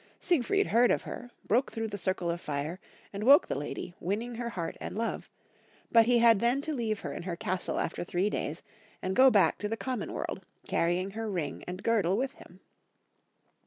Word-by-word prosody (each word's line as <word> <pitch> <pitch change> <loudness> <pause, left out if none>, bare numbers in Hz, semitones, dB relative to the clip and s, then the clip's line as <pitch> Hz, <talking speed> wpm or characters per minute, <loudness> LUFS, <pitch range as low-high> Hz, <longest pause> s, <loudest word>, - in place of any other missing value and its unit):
Siegfried 360 +5 +2
heard 240 +2 +4
of - - +1
her, 245 - -7 0.2
broke 245 +6 +2
through 225 -1 -3
the 205 - -5
circle 185 -3 -1
of 170 0 -4
fire, 150 +5 -3 0.3
and 200 +1 -4
woke 275 +5 +7
the - - -1
lady, 145 +5 -5
winning 220 +7 -2
her 235 0 -4
heart 175 -7 -4
and - - -5
love; 230 +1 -3 0.6
but 230 -1 +6
he 245 0 +5
had 230 -3 +6
then 240 +4 +2
to 310 +2 -3
leave 225 -6 -2
her - - -5
in - - -5
her 175 -1 -4
castle 180 +1 -2
after 170 - -2
three 180 +3 0
days - - -3 0.4
and 185 +1 -1
go 265 +1 +8
back 200 -9 +3
to 210 - -2
the 225 - -2
com 255 0 -3
mon - - -5
world, - - -4 0.2
carrying 175 +3 0
her 220 +1 -4
ring 165 -8 -3
and 180 +1 -6
girdle 200 -5 +2
with 265 +2 -1
him. 180 +2 -16
210 Hz, 205 wpm, -30 LUFS, 180-240 Hz, 0.6 s, go